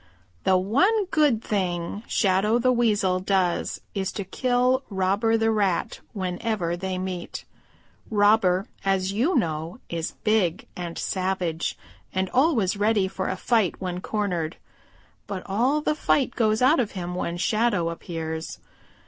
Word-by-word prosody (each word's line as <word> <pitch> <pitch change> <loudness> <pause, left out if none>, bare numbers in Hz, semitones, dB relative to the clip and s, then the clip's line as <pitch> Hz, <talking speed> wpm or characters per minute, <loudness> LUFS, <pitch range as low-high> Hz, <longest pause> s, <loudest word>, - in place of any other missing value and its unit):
"The 190 -1 +5
one 370 - +2
good 285 -8 +3
thing 180 -1 -2
Shadow 200 +2 +2
the 255 +1 +3
Weasel 210 -6 +2
does 185 -2 0
is 195 0 -2
to 200 - -3
kill 250 +5 +1
Robber 200 +3 +1
the 225 0 +2
Rat 200 -5 0
whenever 185 -2 -2
they 185 +1 -3
meet. 185 -1 -5 0.6
Robber, 205 -3 +3 0.2
as 195 0 +1
you 260 - +1
know, 160 - -1
is 165 -1 -3
big 205 -6 +1
and 175 -2 -5
savage 185 -3 -1 0.4
and 190 0 0
always 250 - +3
ready 205 -1 +2
for 190 0 -3
a 185 - -2
fight 220 -3 +1
when 180 -1 -4
cornered. 180 -8 -2 0.7
But 190 -2 -4
all 250 +10 +1
the 300 - +1
fight 280 -4 +1
goes 220 0 +2
out 290 +6 +5
of 235 -5 -1
him 180 -2 -4
when 175 -1 -3
Shadow 205 -4 +1
appears. 160 -1 -5
195 Hz, 140 wpm, -25 LUFS, 180-225 Hz, 0.7 s, The